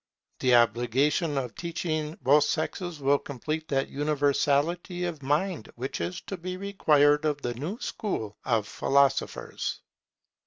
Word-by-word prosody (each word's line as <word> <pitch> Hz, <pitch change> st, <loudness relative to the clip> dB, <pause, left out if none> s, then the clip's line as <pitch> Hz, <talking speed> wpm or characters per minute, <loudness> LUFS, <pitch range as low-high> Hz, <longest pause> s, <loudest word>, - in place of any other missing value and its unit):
The 125 Hz, -1 st, +4 dB
obligation 125 Hz, -, +2 dB
of 125 Hz, -3 st, -2 dB
teaching 160 Hz, -2 st, -3 dB
both 145 Hz, +3 st, +5 dB
sexes 165 Hz, +1 st, -2 dB
will 140 Hz, +1 st, +3 dB
complete 155 Hz, +4 st, -4 dB
that 135 Hz, -1 st, 0 dB
universality 150 Hz, +4 st, +1 dB
of 165 Hz, -4 st, -4 dB
mind 150 Hz, -, -1 dB
which 125 Hz, -5 st, -4 dB
is 85 Hz, +2 st, -3 dB
to 195 Hz, -, -6 dB
be 180 Hz, +1 st, -5 dB
required 150 Hz, -7 st, +3 dB
of 150 Hz, -2 st, -1 dB
the 120 Hz, -, -1 dB
new 155 Hz, -, -5 dB
school 110 Hz, -, -3 dB
of 115 Hz, -5 st, +1 dB
philosophers. 140 Hz, +5 st, 0 dB
145 Hz, 130 wpm, -27 LUFS, 135-165 Hz, -, both